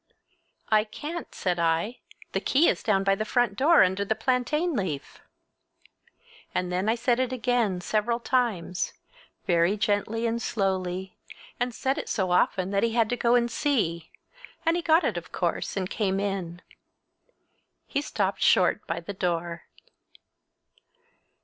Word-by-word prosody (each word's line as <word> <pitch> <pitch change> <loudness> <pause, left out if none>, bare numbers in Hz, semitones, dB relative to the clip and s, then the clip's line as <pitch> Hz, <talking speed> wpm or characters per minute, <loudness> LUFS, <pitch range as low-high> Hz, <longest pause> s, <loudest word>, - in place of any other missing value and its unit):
"I 215 -1 +4
can't," 300 +10 -7
said 180 -2 -1
I. 170 +8 0 0.3
"The - - 0
key 295 +5 +3
is - - +1
down 195 -3 +2
by 195 0 +3
the 205 +2 -1
front 240 -1 +1
door 305 - +6
under 190 +2 0
a 200 +2 0
plantain 260 +9 0
leaf!" 175 - -4 1.4
And 180 0 -1
then 185 +4 0
I 225 - +3
said 240 +1 +1
it 260 -1 0
again, 240 -7 0
several 220 +5 0
times, 230 -9 -1 0.5
very 175 +3 +2
gently 210 +2 0
and 230 0 -1
slowly, 190 -3 -2 0.4
and 245 +1 0
said 265 +4 -1
it - - -6
so 190 -5 0
often 185 +1 +2
that 200 0 +1
he 230 -1 +1
had 230 -2 +2
to - - +2
go 240 0 +3
and 240 -1 +2
see, 170 - 0 0.6
and 330 +1 +3
he 350 - 0
got 330 +1 +4
it, 220 -10 0
of 170 - -7
course, 175 +2 -2
and 185 -1 -1
came 195 -1 -1
in. 190 -3 -3 1.2
He 280 - -1
stopped 200 -8 -2
short 180 -2 +3
by 165 +1 -2
the 185 +4 -6
door. 170 -2 -2
210 Hz, 155 wpm, -26 LUFS, 185-245 Hz, 1.4 s, door